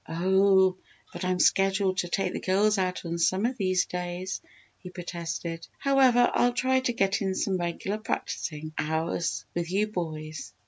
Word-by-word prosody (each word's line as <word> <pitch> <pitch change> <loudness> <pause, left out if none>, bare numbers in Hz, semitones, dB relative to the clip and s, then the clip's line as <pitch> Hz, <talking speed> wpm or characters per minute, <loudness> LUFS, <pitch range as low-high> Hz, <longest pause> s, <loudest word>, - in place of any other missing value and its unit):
"Oh, 190 +2 +3 0.4
but - - -6
I'm 185 0 +1
scheduled 195 0 +3
to 175 - 0
take 185 +1 -1
the - - -3
girls 200 +2 +2
out 185 -1 -2
on 170 0 -3
some 185 +5 +2
of 250 +2 0
these 185 -2 +1
days," 180 +1 -4 0.4
he 180 - -9
protested. 170 -2 -5
"However, 260 -3 +4
I'll 245 0 +3
try 260 +1 +2
to 260 -1 0
get 195 -3 +1
in 190 -1 -1
some 190 -1 0
regular 175 +4 -3
practising 155 -7 -4
hours 160 +2 -1
with 170 -1 -2
you 200 +3 +2
boys." 155 -6 -5
185 Hz, 165 wpm, -27 LUFS, 170-200 Hz, 0.4 s, However